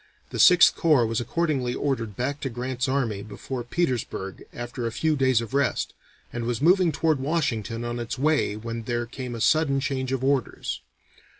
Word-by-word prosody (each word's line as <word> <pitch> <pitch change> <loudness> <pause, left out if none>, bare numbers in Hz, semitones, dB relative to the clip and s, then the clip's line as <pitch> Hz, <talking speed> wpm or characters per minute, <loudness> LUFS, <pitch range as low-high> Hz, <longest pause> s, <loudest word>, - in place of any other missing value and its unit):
The - - -4
Sixth 180 -2 +7
Corps 150 -8 +4
was 115 +1 -1
accordingly 135 -4 -1
ordered 115 -8 -2
back 140 +5 -2
to 135 - -2
Grant's 125 +2 -3
army 120 -7 0
before 110 +5 -6
Petersburg 120 - -2
after 120 0 -5
a - - -3
few 155 +6 +1
days 130 -4 +3
of 115 +2 -7
rest, 140 -3 0 0.4
and 120 -1 -3
was 120 -1 -1
moving 180 +2 +4
toward 155 0 +1
Washington 120 -6 -1
on 120 0 -3
its 120 +2 -4
way 145 -6 +2
when 115 +1 -5
there 120 0 -1
came 125 0 -6
a - - -6
sudden 150 -1 +3
change 130 -2 -2
of 130 -1 -1
orders. 135 -4 -1
125 Hz, 180 wpm, -25 LUFS, 115-140 Hz, 0.4 s, Sixth